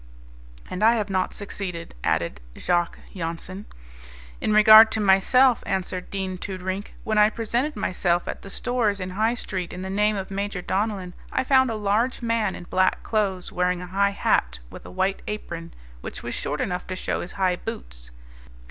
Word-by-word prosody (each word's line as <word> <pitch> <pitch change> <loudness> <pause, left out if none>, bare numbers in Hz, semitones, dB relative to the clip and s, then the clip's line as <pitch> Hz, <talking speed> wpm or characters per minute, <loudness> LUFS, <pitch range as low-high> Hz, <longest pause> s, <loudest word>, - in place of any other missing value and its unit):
"And 185 - -5
I 230 +2 +6
have 210 -3 -2
not 185 -1 0
succeeded," 185 -4 -6
added 80 -5 0 0.2
Jacques 175 -1 0 0.2
Jansen. 175 +3 -5 0.7
"In - - 0
regard 215 +1 +9
to 220 - +1
myself," 215 +6 +4
answered 185 -2 -3
Dean 190 -2 -4
Toodrink, 190 +1 -5
"when 215 -1 +1
I 210 0 +6
presented 235 +7 -1
myself 175 -1 0
at - - -5
the 195 - -10
stores 225 -2 0
in 185 0 -4
High 220 +5 +1
Street 185 -6 -4
in 180 +1 -6
the 190 - -4
name 210 +2 +2
of 195 -1 -5
Major 200 -2 -3
Donellan 195 -3 -2 0.2
I - - 0
found 260 -1 +4
a 225 - -2
large 215 +5 0
man 230 -4 0
in - - -8
black 185 +1 +1
clothes, 195 -5 -1
wearing 180 0 0
a 180 +1 -10
high 200 +1 +3
hat, 60 0 +1
with - - -10
a - - -9
white 190 +1 0
apron, 170 -5 -5 0.3
which - - -7
was - - -4
short 145 +1 -2
enough 180 -1 -3
to 185 - -4
show - - -2
his 175 - -7
high 185 -2 +1
boots. - - -8
195 Hz, 180 wpm, -24 LUFS, 180-215 Hz, 0.7 s, regard